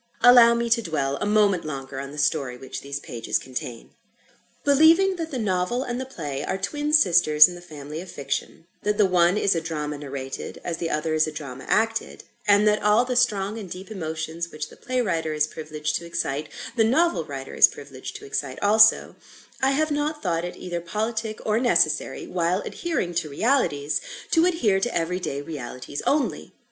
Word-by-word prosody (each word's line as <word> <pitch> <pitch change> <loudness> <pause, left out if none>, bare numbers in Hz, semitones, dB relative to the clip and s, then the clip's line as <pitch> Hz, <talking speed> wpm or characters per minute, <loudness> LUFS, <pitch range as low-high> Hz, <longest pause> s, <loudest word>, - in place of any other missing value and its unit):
Allow 240 -1 +8
me 235 0 -1
to 230 0 +4
dwell 140 -7 -1
a 205 - -2
moment 205 -4 +3
longer 135 -3 -6
on 135 0 -6
the 150 - -10
story 145 -4 0
which 130 - -7
these 140 0 -5
pages 115 -4 -3
contain. 125 -2 -7 0.7
Believing 325 +7 +5
that 325 -1 -4
the 270 - -4
Novel 210 +3 0
and 245 -1 -4
the 260 - -6
Play 145 - -5
are 190 - -2
twin 295 +9 -2
sisters 170 - +6
in 180 - -7
the 175 - -10
family 150 -2 -8
of 185 - -11
Fiction; 140 +3 -4 0.2
that 210 0 0
the 210 - +5
one 180 0 +3
is 200 - +2
a 165 - -1
drama 150 -2 -4
narrated, 135 -2 -6
as 170 -2 -3
the 165 -1 -3
other 155 +1 -1
is 155 0 +3
a - - -4
drama 140 -4 -8
acted; 225 +1 0 0.2
and 205 +1 +5
that 210 0 +3
all 210 +4 +4
the 250 0 -2
strong 215 -3 +1
and 195 -4 -8
deep 185 +4 -9
emotions 160 -2 -4
which 150 -1 -6
the - - -14
Play 255 -1 -2
writer 165 -7 -1
is 150 0 +2
privileged 155 -1 -4
to 170 - -9
excite, 150 -3 -3 0.3
the 225 - +4
Novel 265 - +2
writer 135 -2 -7
is - - +7
privileged 140 -2 -9
to - - -9
excite 135 -1 -3
also, 215 +1 +5 0.5
I 265 - +3
have 310 +2 +1
not 295 +1 -2
thought 170 -3 0
it 175 - -6
either 175 -1 -5
politic 215 +4 -3
or 215 +1 +2
necessary, 255 - +1
while 180 - 0
adhering 315 - -3
to 170 -2 -2
realities, 145 - 0 0.3
to 330 +2 +4
adhere 230 - +2
to 240 +1 -1
every 175 +2 -1
day 140 -5 -4
realities 140 -2 -6
only. 290 -1 0
175 Hz, 195 wpm, -24 LUFS, 150-225 Hz, 0.7 s, Allow